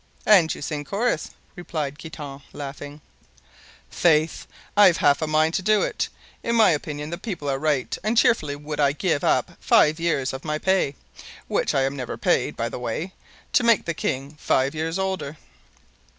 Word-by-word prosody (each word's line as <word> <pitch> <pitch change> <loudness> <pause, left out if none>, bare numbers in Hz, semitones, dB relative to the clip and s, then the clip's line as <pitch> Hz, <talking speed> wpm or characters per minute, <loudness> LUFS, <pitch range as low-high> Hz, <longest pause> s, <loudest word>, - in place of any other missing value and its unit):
"And 185 -7 +6
you - - -8
sing 150 0 -3
chorus," 200 - -1 0.3
replied 155 -5 -4
Guitant, 145 -4 -8
laughing. 145 +1 -8 0.9
"Faith, 160 -2 +2 0.3
I've 200 -5 +6
half 140 +1 +3
a 155 - 0
mind 155 +1 +2
to - - 0
do 215 +2 +3
it. - - -2 0.3
In 235 - -1
my 225 -2 +6
opinion 150 0 -3
the 170 - -4
people 185 -9 -5
are 135 -1 0
right; 145 -3 0
and 220 +3 0
cheerfully 155 -12 +3
would 150 +1 -6
I 140 -1 +3
give 155 -1 -1
up - - +2
five 155 +2 +4
years 150 -6 0
of 130 - -6
my 150 -1 -2
pay—which 185 -5 -2
I 135 - +3
am 135 +1 -1
never 125 -3 -5
paid, - - +1
by 115 - -1
the 120 - -6
way—to 155 - -3
make 230 -3 +4
the 170 - -1
king 140 -1 -3
five 135 +2 +1
years 160 +2 -2
older." 190 -6 -3
155 Hz, 170 wpm, -24 LUFS, 140-180 Hz, 0.9 s, And